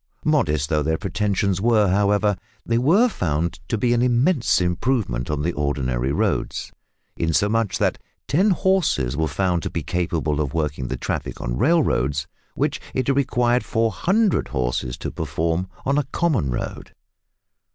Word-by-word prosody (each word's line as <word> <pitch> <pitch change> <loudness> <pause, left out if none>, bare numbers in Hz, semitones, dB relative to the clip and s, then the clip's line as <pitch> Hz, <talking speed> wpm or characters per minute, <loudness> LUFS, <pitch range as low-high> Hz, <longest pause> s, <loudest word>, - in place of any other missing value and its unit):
Modest 75 - +2
though 75 -3 +2
their 80 +2 0
pretensions 100 -1 -1
were, 110 -2 +4
however, 100 +1 +2 0.3
they 115 0 +1
were 180 - +4
found 80 - -2
to 115 - -1
be 120 +3 +2
an 120 - +2
immense 125 +4 +3
improvement 90 - -1
on 75 -1 -1
the 85 +2 0
ordinary 70 -3 -1
roads, - - -1 0.5
insomuch 105 +5 +1
that - - 0 0.3
ten 180 - +3
horses 180 - +1
were 80 +1 0
found 90 +3 0
to - - -3
be 85 - -4
capable 80 -3 -1
of 70 -1 -3
working 75 -5 -1
the - - -3
traffic - - -4
on - - -3
railroads, 75 - +2 0.3
which - - -1
it 130 0 0
required 125 -3 +2
400 185 - +1
horses 60 -2 -2
to - - -5
perform 85 +3 -2 0.2
on 140 +2 +2
a - - +1
common 150 - +1
road. - - -5
95 Hz, 150 wpm, -22 LUFS, 75-125 Hz, 0.5 s, were